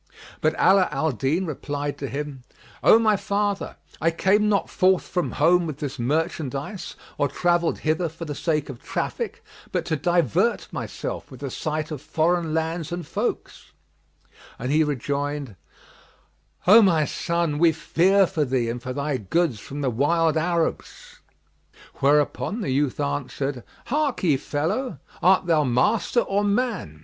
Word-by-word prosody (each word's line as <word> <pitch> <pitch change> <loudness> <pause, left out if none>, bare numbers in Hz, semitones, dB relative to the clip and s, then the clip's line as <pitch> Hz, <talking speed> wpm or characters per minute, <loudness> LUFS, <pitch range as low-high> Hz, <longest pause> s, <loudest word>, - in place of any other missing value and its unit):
But 155 +1 +2
Ala 190 -1 +5
al 150 +2 0
Din 140 - 0
replied 145 -2 -4
to 140 - -3
him, 145 -2 -5 0.4
"O - - +8
my 220 -2 +3
father, 200 0 -1 0.3
I 165 - +4
came 200 +5 +2
not 200 -2 +1
forth 185 -2 +2
from 180 -2 -2
home 170 +3 +3
with 150 -3 -5
this 140 -3 -5
merchandise, 150 - -2 0.2
or 145 - +3
travelled 175 +3 +1
hither 160 +2 0
for 165 +2 -8
the 150 - -4
sake 150 0 -1
of 135 -4 -9
traffic, - - -4 0.3
but - - -1
to 160 - 0
divert 175 - +1
myself - - -5
with - - -12
the - - -4
sight 155 0 -3
of 150 -4 -5
foreign 165 +1 0
lands 160 0 -2
and 175 -1 -4
folks;" - - -4 0.8
and 125 +3 -3
he 155 +2 +4
rejoined, 145 -3 -3 1.1
"O 215 +5 +8
my 165 -7 +4
son, 170 0 -1
we 170 0 +5
fear 185 +5 +3
for 170 -4 -1
thee 125 -4 0
and 120 +1 -6
for 130 0 -5
thy 140 0 -1
goods 125 - 0
from 145 +7 -7
the 135 -3 0
wild 160 +6 +2
Arabs." 165 +1 -2 0.8
Whereupon 150 - +1
the 165 - -2
youth 135 0 0
answered 125 - -2 0.2
"Harkye, 250 - +1
fellow, 160 - -2 0.2
art 185 +1 +4
thou 160 -3 +3
master 210 - +2
or 200 -1 0
man? 205 - -1
160 Hz, 150 wpm, -24 LUFS, 145-180 Hz, 1.1 s, O